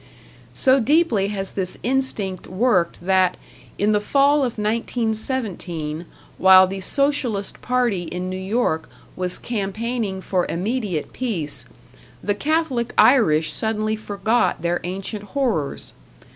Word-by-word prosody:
So 265 +1 +4
deeply 255 - +2
has 195 -2 -4
this 185 -2 -3
instinct 230 -7 0
worked 185 -4 +1
that, 185 -1 +3 0.4
in 205 +1 +2
the 210 -1 +2
fall 280 +6 +3
of 255 -6 -1
1917 215 - -1 0.3
while 190 0 +8
the 195 +1 -5
Socialist 250 -3 -1
party 245 -8 0
in 180 +2 -4
New 185 - -4
York 190 -4 -1 0.3
was 180 -1 -1
campaigning 215 -1 -3
for 185 -1 -1
immediate 195 - -2
peace, 180 - -2 0.6
the 205 - +1
Catholic 285 -1 -1
Irish 215 - +4
suddenly 220 0 -1
forgot 215 -2 0
their 175 +1 0
ancient 195 +4 -4
horrors. 215 - -1
210 Hz, 115 wpm, -22 LUFS, 185-245 Hz, 0.6 s, while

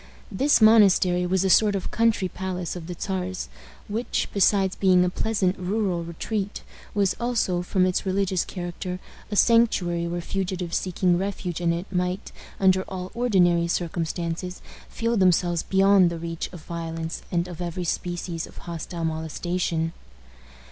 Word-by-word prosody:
This 270 +6 +3
monastery 190 -5 +5
was 190 +1 +1
a 190 - +1
sort 210 0 +5
of 190 - -4
country 225 -4 +2
palace 180 -1 -4
of 170 -2 -7
the 180 - -5
Czar's, 185 -1 -3 0.4
which, 225 +4 -2
besides 195 -1 +3
being 185 -2 +4
a 180 - 0
pleasant 195 -3 0
rural 185 -2 -1
retreat, 195 +5 -4 0.3
was 200 -2 +2
also, 230 -7 0
from 185 +1 +1
its 185 -1 0
religious 190 -1 0
character, 180 0 -5 0.3
a 210 - -3
sanctuary 190 -7 +3
where 175 +1 -3
fugitives 180 -1 -3
seeking 180 -1 +1
refuge 185 -3 -3
in 170 -1 +2
it 170 +2 -2
might, 180 +2 -2 0.3
under 190 -1 +4
all 185 -1 -6
ordinary 180 -8 +3
circumstances, 170 +1 -3 0.3
feel 230 0 -1
themselves 175 -3 +3
beyond 195 -1 +4
the 170 - -4
reach 165 0 -4
of 175 -4 -10
violence 165 -1 -5
and 175 0 0
of 175 -1 -8
every 175 +1 -3
species 175 0 -3
of - - -17
hostile 170 0 -5
molestation. 165 +1 -2
180 Hz, 150 wpm, -25 LUFS, 170-195 Hz, 0.4 s, monastery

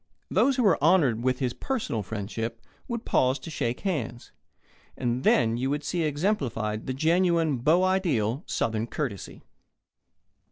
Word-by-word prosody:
Those 275 - +3
who 250 - +1
were 195 -9 +3
honoured 150 -9 +4
with 130 0 +1
his 125 -3 -1
personal 235 - -2
friendship 115 +3 -4 0.3
would 235 -2 -4
pause 130 +1 +2
to 160 +4 -9
shake 120 -6 -2
hands, 125 - -3 0.7
and 125 0 -1
then 115 -1 +3
you 130 +2 -1
would 145 +1 -1
see 170 +4 -1
exemplified 140 - -1
the 130 - -1
genuine 165 -1 +2
beau 155 +9 +3
ideal 150 - +1
Southern 110 0 -1
courtesy. 120 -8 -5
135 Hz, 145 wpm, -27 LUFS, 115-170 Hz, 0.7 s, honoured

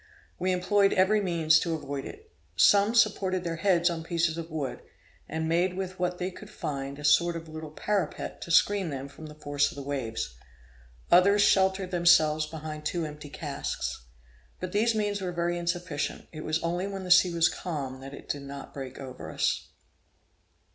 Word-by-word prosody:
We 185 +1 +1
employed 195 +2 +3
every 205 +3 +3
means 165 -4 +3
to 165 -2 -1
avoid 140 -2 -5
it. 440 +1 -11 0.2
Some 205 +3 +5
supported 195 -4 +2
their 165 -1 -3
heads 175 -1 +3
on 170 -2 -1
pieces 165 -1 0
of 165 0 -6
wood, 150 -5 -4 0.5
and 160 0 -2
made 175 +3 +1
with 185 -1 -4
what 180 0 -1
they 180 +1 -3
could 210 +3 -12
find 140 -8 -5
a 145 - -9
sort 170 +4 +4
of 165 0 -6
little 155 0 -7
parapet 185 +1 -2
to - - -7
screen 190 +2 +4
them 135 -1 -5
from 140 +3 -11
the 150 - -11
force 145 -1 0
of 175 - -11
the 140 - -6
waves; 120 - -3 0.8
others 200 +4 +6
sheltered 190 -1 +3
themselves 155 -3 +4
behind 155 -1 -7
two 170 +2 -1
empty 150 -1 -8
casks. 140 - -4 0.5
But - - -4
these 225 +2 +2
means 205 -2 -1
were 185 -1 -2
very 175 0 -1
insufficient: 170 -3 -3
it 155 - -7
was 155 0 0
only 175 +3 -1
when 195 -1 -5
the 180 - -4
sea 180 0 +7
was 170 -1 +4
calm 140 -7 -4
that 135 +1 -9
it - - -13
did 145 - -3
not 140 0 -9
break 135 -2 -7
over 130 -2 -8
us. - - 0
170 Hz, 185 wpm, -28 LUFS, 150-185 Hz, 0.8 s, sea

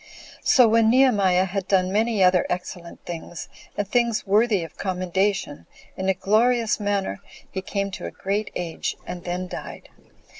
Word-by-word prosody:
So 250 -3 +6
when 225 0 +4
Nehemiah 205 -8 +4
had 190 0 -3
done 185 -1 +2
many 215 0 +2
other 180 -1 +4
excellent 180 -1 -6
things, 170 0 -7 0.3
and 205 - -1
things 235 0 +1
worthy 205 -1 +3
of 165 0 -10
commendation, 185 - -1 0.3
in 190 0 -2
a 190 - +2
glorious 225 +5 +2
manner, 200 - -1 0.3
he 190 - -3
came 200 +1 -3
to 190 - -6
a - - -7
great 200 +2 -2
age, 170 -2 -3
and 175 0 -7
then 180 +1 -3
died. - - -8
195 Hz, 155 wpm, -24 LUFS, 180-215 Hz, 0.3 s, So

